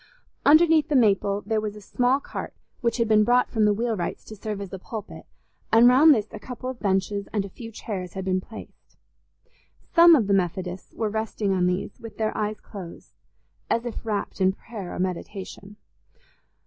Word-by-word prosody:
Underneath 315 Hz, 0 st, +6 dB
the 295 Hz, -, +1 dB
maple 200 Hz, -4 st, +3 dB
there 220 Hz, 0 st, 0 dB
was 210 Hz, -1 st, -4 dB
a -, -, -9 dB
small 250 Hz, +6 st, +1 dB
cart, -, -, -7 dB, 0.2 s
which 235 Hz, -1 st, 0 dB
had 230 Hz, -2 st, +1 dB
been 215 Hz, -1 st, +5 dB
brought 245 Hz, +3 st, +3 dB
from 220 Hz, -2 st, +2 dB
the 210 Hz, -, +4 dB
wheelwright's 215 Hz, -4 st, -2 dB
to 215 Hz, -, -9 dB
serve 210 Hz, 0 st, -5 dB
as 195 Hz, -2 st, -7 dB
a 190 Hz, -, -5 dB
pulpit, 215 Hz, +2 st, -8 dB, 0.4 s
and 230 Hz, +2 st, +7 dB
round 275 Hz, +6 st, +7 dB
this 210 Hz, -3 st, -1 dB
a 215 Hz, -, -8 dB
couple 255 Hz, +3 st, -6 dB
of 250 Hz, -, -12 dB
benches 200 Hz, 0 st, -1 dB
and 205 Hz, -2 st, -1 dB
a -, -, -8 dB
few 225 Hz, +4 st, -10 dB
chairs 190 Hz, -5 st, -6 dB
had 190 Hz, -1 st, -5 dB
been 185 Hz, 0 st, 0 dB
placed. 220 Hz, +3 st, -13 dB, 1.0 s
Some 335 Hz, 0 st, +8 dB
of 240 Hz, -8 st, +2 dB
the 200 Hz, -, +1 dB
Methodists 185 Hz, 0 st, -2 dB
were 220 Hz, -2 st, -1 dB
resting 220 Hz, -2 st, -1 dB
on 180 Hz, -1 st, +2 dB
these, 180 Hz, +2 st, -3 dB
with 225 Hz, -2 st, -10 dB
their 215 Hz, -1 st, -1 dB
eyes 215 Hz, 0 st, -2 dB
closed, 185 Hz, -5 st, -11 dB, 0.6 s
as 230 Hz, +1 st, 0 dB
if 240 Hz, -, -5 dB
wrapt 210 Hz, -3 st, -3 dB
in 190 Hz, 0 st, +4 dB
prayer 205 Hz, -3 st, -8 dB
or -, -, -6 dB
meditation. 190 Hz, +2 st, -5 dB
210 Hz, 190 wpm, -25 LUFS, 195-235 Hz, 1.0 s, Some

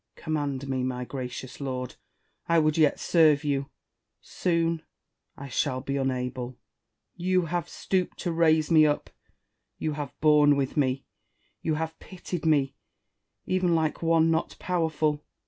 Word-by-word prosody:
Command 145 Hz, -4 st, -3 dB
me, 130 Hz, -1 st, -1 dB
my 125 Hz, -1 st, -2 dB
gracious 130 Hz, 0 st, -6 dB
lord! 130 Hz, -2 st, -4 dB, 0.5 s
I 170 Hz, -, +4 dB
would 155 Hz, -1 st, +3 dB
yet 155 Hz, -3 st, +3 dB
serve 155 Hz, -3 st, +4 dB
you: 140 Hz, -1 st, -1 dB, 0.5 s
soon 165 Hz, -2 st, 0 dB, 0.6 s
I 140 Hz, -, -7 dB
shall 130 Hz, 0 st, -1 dB
be 135 Hz, +2 st, -3 dB
unable. 125 Hz, -2 st, -2 dB, 0.6 s
You 185 Hz, +1 st, +1 dB
have 170 Hz, 0 st, -2 dB
stooped 185 Hz, -2 st, -1 dB
to 175 Hz, -, -1 dB
raise 160 Hz, -1 st, +3 dB
me 155 Hz, -1 st, +7 dB
up; 145 Hz, -, -1 dB, 0.7 s
you 155 Hz, -, -2 dB
have 145 Hz, -2 st, -6 dB
borne 150 Hz, -1 st, +5 dB
with 135 Hz, -2 st, -1 dB
me; 135 Hz, -2 st, 0 dB, 0.6 s
you 160 Hz, -1 st, 0 dB
have 160 Hz, +1 st, -4 dB
pitied 180 Hz, -3 st, -5 dB
me, 140 Hz, -3 st, +3 dB, 0.7 s
even 185 Hz, -2 st, +2 dB
like 160 Hz, -2 st, 0 dB
one 165 Hz, -1 st, +3 dB
not 160 Hz, 0 st, -1 dB
powerful. 155 Hz, -4 st, 0 dB
150 Hz, 140 wpm, -27 LUFS, 135-165 Hz, 0.7 s, me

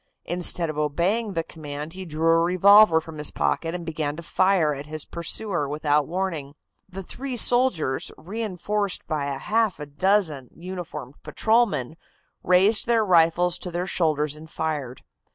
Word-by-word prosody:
Instead 175 Hz, 0 st, +2 dB
of 155 Hz, -1 st, -4 dB
obeying 185 Hz, +9 st, 0 dB
the 165 Hz, -2 st, -1 dB
command 150 Hz, -1 st, -8 dB
he 190 Hz, 0 st, -8 dB
drew 160 Hz, -1 st, -3 dB
a 165 Hz, 0 st, +4 dB
revolver 185 Hz, +1 st, +6 dB
from 160 Hz, -1 st, -10 dB
his 150 Hz, -, +3 dB
pocket 165 Hz, +1 st, -1 dB
and 175 Hz, -1 st, -6 dB
began 155 Hz, -2 st, -3 dB
to 170 Hz, -, -9 dB
fire 180 Hz, -3 st, +2 dB
at 140 Hz, +1 st, -8 dB
his 155 Hz, -1 st, -5 dB
pursuer 170 Hz, -2 st, 0 dB
without 150 Hz, -1 st, +1 dB
warning. 165 Hz, -6 st, -4 dB, 0.3 s
The 190 Hz, +1 st, -7 dB
three 260 Hz, +6 st, -6 dB
soldiers, 230 Hz, -, +2 dB
reinforced 205 Hz, 0 st, -3 dB
by 150 Hz, -3 st, -2 dB
half 205 Hz, +10 st, -1 dB
a 150 Hz, -, -5 dB
dozen 150 Hz, -3 st, 0 dB
uniformed 175 Hz, -5 st, -8 dB
patrolmen, 205 Hz, -, 0 dB, 0.4 s
raised 190 Hz, +6 st, +3 dB
their 230 Hz, -2 st, +2 dB
rifles 175 Hz, -1 st, +3 dB
to 180 Hz, -, -6 dB
their 175 Hz, +1 st, -3 dB
shoulders 150 Hz, -5 st, 0 dB
and 160 Hz, +1 st, -12 dB
fired. 145 Hz, -7 st, -4 dB
170 Hz, 155 wpm, -24 LUFS, 150-190 Hz, 0.4 s, revolver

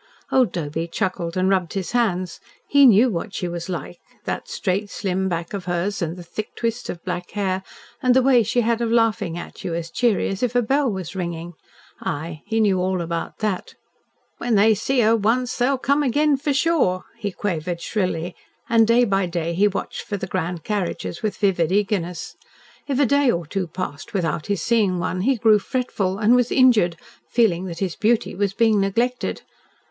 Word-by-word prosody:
Old 255 Hz, -7 st, +3 dB
Doby 165 Hz, -1 st, -3 dB
chuckled 170 Hz, 0 st, -2 dB
and 185 Hz, 0 st, +2 dB
rubbed 185 Hz, -3 st, +1 dB
his 190 Hz, -3 st, -3 dB
hands. 190 Hz, -7 st, 0 dB, 0.3 s
He 280 Hz, -1 st, +6 dB
knew 235 Hz, +2 st, +6 dB
what 185 Hz, +2 st, -4 dB
she 180 Hz, -, -2 dB
was 170 Hz, +1 st, -5 dB
like. 175 Hz, -1 st, -5 dB, 0.3 s
That -, -, -3 dB
straight, 200 Hz, +1 st, -2 dB
slim 190 Hz, -1 st, -1 dB
back 170 Hz, 0 st, -3 dB
of 195 Hz, -3 st, -4 dB
hers, 180 Hz, +3 st, -1 dB
and 170 Hz, +1 st, -2 dB
the 175 Hz, -, -8 dB
thick 215 Hz, +5 st, -6 dB
twist 230 Hz, +1 st, -3 dB
of 170 Hz, -, -6 dB
black 175 Hz, 0 st, -4 dB
hair, 190 Hz, -2 st, -1 dB, 0.4 s
and 255 Hz, -2 st, +3 dB
the 260 Hz, -, +5 dB
way 255 Hz, -2 st, +5 dB
she 240 Hz, +3 st, +1 dB
had 235 Hz, 0 st, 0 dB
of 230 Hz, -1 st, 0 dB
laughing 225 Hz, -7 st, +1 dB
at 175 Hz, -, -9 dB
you, 175 Hz, -3 st, -2 dB
as 170 Hz, -1 st, -4 dB
cheery 235 Hz, -4 st, +1 dB
as 195 Hz, 0 st, -4 dB
if 245 Hz, -1 st, 0 dB
a 245 Hz, -, +4 dB
bell 270 Hz, +2 st, +1 dB
was 190 Hz, -2 st, -5 dB
ringing. 170 Hz, -1 st, -4 dB, 0.5 s
Aye, 155 Hz, +2 st, -4 dB
he 225 Hz, -, 0 dB
knew 200 Hz, -4 st, +3 dB
all 185 Hz, 0 st, 0 dB
about 170 Hz, -1 st, -4 dB
that. 210 Hz, -4 st, -2 dB, 0.6 s
"When 240 Hz, -2 st, +1 dB
they 215 Hz, +2 st, +5 dB
see 245 Hz, +5 st, +1 dB
her 225 Hz, +1 st, +4 dB
once, 235 Hz, +4 st, +1 dB
they'll 265 Hz, +2 st, +2 dB
come 280 Hz, +3 st, +1 dB
agen, 290 Hz, +3 st, +3 dB
for 285 Hz, +2 st, -1 dB
sure," 280 Hz, -, +2 dB, 0.2 s
he 205 Hz, -, -2 dB
quavered 175 Hz, -3 st, -3 dB
shrilly, 180 Hz, -3 st, -2 dB, 0.3 s
and 230 Hz, -2 st, +4 dB
day 240 Hz, +1 st, +5 dB
by 195 Hz, -3 st, +1 dB
day 170 Hz, -1 st, -2 dB
he 200 Hz, +5 st, +4 dB
watched 200 Hz, -, -4 dB
for 205 Hz, -, -4 dB
the 190 Hz, -, -4 dB
grand 175 Hz, -3 st, -3 dB
carriages 200 Hz, -4 st, -3 dB
with 210 Hz, -3 st, -2 dB
vivid 180 Hz, -5 st, +1 dB
eagerness. 190 Hz, -4 st, -1 dB, 0.5 s
If 275 Hz, -2 st, 0 dB
a 285 Hz, -, +5 dB
day 280 Hz, +1 st, +3 dB
or 170 Hz, -6 st, 0 dB
two 185 Hz, +4 st, -3 dB
passed 180 Hz, +5 st, -6 dB
without 165 Hz, -4 st, -1 dB
his 200 Hz, -5 st, -1 dB
seeing 210 Hz, -6 st, +2 dB
one, 180 Hz, +1 st, -2 dB
he 265 Hz, +7 st, +2 dB
grew 220 Hz, -2 st, +4 dB
fretful, 200 Hz, -5 st, -2 dB
and 220 Hz, +3 st, +4 dB
was 245 Hz, -1 st, +2 dB
injured, 220 Hz, -10 st, +4 dB, 0.3 s
feeling 190 Hz, -7 st, +2 dB
that 170 Hz, -3 st, -6 dB
his 185 Hz, -2 st, -2 dB
beauty 225 Hz, +1 st, +1 dB
was 195 Hz, 0 st, -1 dB
being 220 Hz, -3 st, +3 dB
neglected! 235 Hz, +6 st, -1 dB
200 Hz, 195 wpm, -22 LUFS, 175-235 Hz, 0.6 s, He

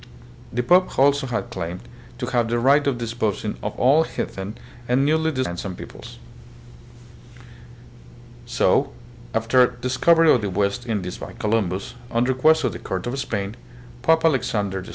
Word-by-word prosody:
The 125 Hz, +2 st, -1 dB
pope 180 Hz, +7 st, +4 dB
had -, -, -6 dB
also 140 Hz, 0 st, +3 dB
claimed 110 Hz, -8 st, -4 dB, 0.4 s
to -, -, -3 dB
have 120 Hz, -2 st, 0 dB
the 120 Hz, -, +1 dB
right 140 Hz, +4 st, +3 dB
of 135 Hz, -3 st, +1 dB
disposing 110 Hz, -3 st, -2 dB
of -, -, -5 dB
all 140 Hz, +6 st, +5 dB
heathen 100 Hz, -9 st, -5 dB, 0.3 s
and 130 Hz, +3 st, +3 dB
newly 160 Hz, +2 st, +2 dB
discovered 130 Hz, -4 st, -1 dB
lands 85 Hz, +3 st, -6 dB
and 95 Hz, -2 st, -5 dB
peoples. -, -, -10 dB, 2.3 s
So, 125 Hz, +3 st, +2 dB, 0.4 s
after 120 Hz, +3 st, +4 dB
the 125 Hz, -, -13 dB
discovery 155 Hz, +6 st, +4 dB
of 120 Hz, -, +3 dB
the 100 Hz, -, -2 dB
West 100 Hz, +6 st, -1 dB
Indies 95 Hz, -5 st, -3 dB
by -, -, -8 dB
Columbus, 105 Hz, 0 st, -1 dB, 0.2 s
on 115 Hz, 0 st, +1 dB
request 140 Hz, +5 st, +3 dB
of -, -, +1 dB
the -, -, -7 dB
Court 95 Hz, -1 st, -4 dB
of 125 Hz, +3 st, -3 dB
Spain, 100 Hz, -4 st, -3 dB, 0.5 s
Pope 160 Hz, +4 st, +3 dB
Alexander 105 Hz, -10 st, 0 dB
VI. 95 Hz, -, -11 dB
120 Hz, 160 wpm, -22 LUFS, 105-135 Hz, 2.3 s, all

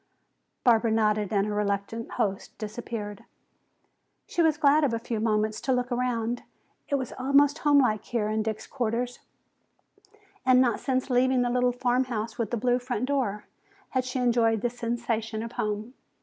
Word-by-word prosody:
Barbara 230 Hz, -1 st, +4 dB
nodded 215 Hz, -2 st, +1 dB
and 200 Hz, -2 st, +2 dB
her 210 Hz, -, -2 dB
reluctant 205 Hz, +2 st, -2 dB
host 195 Hz, -2 st, -2 dB
disappeared. 215 Hz, -1 st, -6 dB, 1.0 s
She 345 Hz, -, -1 dB
was 320 Hz, -2 st, +3 dB
glad 295 Hz, +1 st, +4 dB
of 255 Hz, -5 st, +2 dB
a -, -, 0 dB
few 230 Hz, -1 st, -4 dB
moments 215 Hz, -1 st, 0 dB
to 270 Hz, -, -1 dB
look 250 Hz, 0 st, -1 dB
around. 245 Hz, -1 st, -1 dB, 0.5 s
It 285 Hz, -, +2 dB
was 260 Hz, -3 st, -3 dB
almost 280 Hz, +3 st, +4 dB
homelike 275 Hz, -8 st, +3 dB
here 230 Hz, -4 st, -1 dB
in 215 Hz, 0 st, 0 dB
Dick's 220 Hz, 0 st, -3 dB
quarters, 245 Hz, -1 st, -2 dB, 1.2 s
and 255 Hz, -1 st, +5 dB
not 250 Hz, -2 st, +3 dB
since 260 Hz, 0 st, -1 dB
leaving 250 Hz, 0 st, +3 dB
the 245 Hz, -, 0 dB
little 250 Hz, 0 st, +2 dB
"Farmhouse 245 Hz, -3 st, -1 dB
with 225 Hz, -3 st, -1 dB
the 240 Hz, -, -1 dB
Blue 245 Hz, +2 st, +2 dB
Front 245 Hz, -1 st, -2 dB
Door" 250 Hz, -7 st, -1 dB, 0.4 s
had 260 Hz, -1 st, 0 dB
she 255 Hz, +1 st, -4 dB
enjoyed 235 Hz, -3 st, +2 dB
the 240 Hz, -, 0 dB
sensation 230 Hz, -2 st, -2 dB
of 230 Hz, -, -6 dB
home. 215 Hz, +3 st, -3 dB
240 Hz, 165 wpm, -27 LUFS, 220-255 Hz, 1.2 s, and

